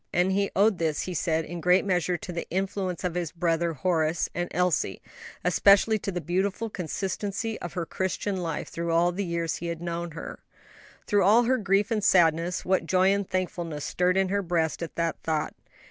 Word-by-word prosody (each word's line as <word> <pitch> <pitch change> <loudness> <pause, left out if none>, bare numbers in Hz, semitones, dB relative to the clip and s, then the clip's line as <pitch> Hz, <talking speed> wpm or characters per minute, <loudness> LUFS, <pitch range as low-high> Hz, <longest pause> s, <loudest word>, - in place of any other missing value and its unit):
And 180 +2 +2
he 200 +1 +1
owed 205 -1 +3
this, 160 -3 0
he 185 - -4
said, 160 -2 0
in 175 +1 -6
great 180 +3 +4
measure 180 -2 +1
to 180 - -7
the 170 -1 -5
influence 190 0 -2
of 180 -2 -1
his 175 -3 -2
brother 170 0 0
Horace 160 +2 0
and 175 0 -2
Elsie, 175 - 0 0.5
especially 200 +4 +5
to 195 - -3
the 175 - -3
beautiful 195 +6 -1
consistency 200 +5 -3
of 175 - -6
her 175 -2 -2
Christian 190 +3 -2
life 165 -4 -3
through 170 0 -3
all 170 +1 +3
the 195 +3 -3
years 170 -2 -2
he 170 - -5
had 170 -1 -4
known 170 -1 -4
her. 165 - -7 0.7
Through 205 -1 +2
all 215 +6 +6
her 255 +2 +2
grief 200 0 +1
and 215 -2 0
sadness, 170 -2 +3
what 185 -3 +1
joy 185 +1 +4
and 200 -1 -2
thankfulness 175 -5 -3
stirred 180 +1 +1
in 190 -1 +2
her 200 +1 +1
breast 170 -3 -1
at 170 - -5
that 165 -1 -1
thought. 155 -2 -1
180 Hz, 195 wpm, -27 LUFS, 170-195 Hz, 0.7 s, all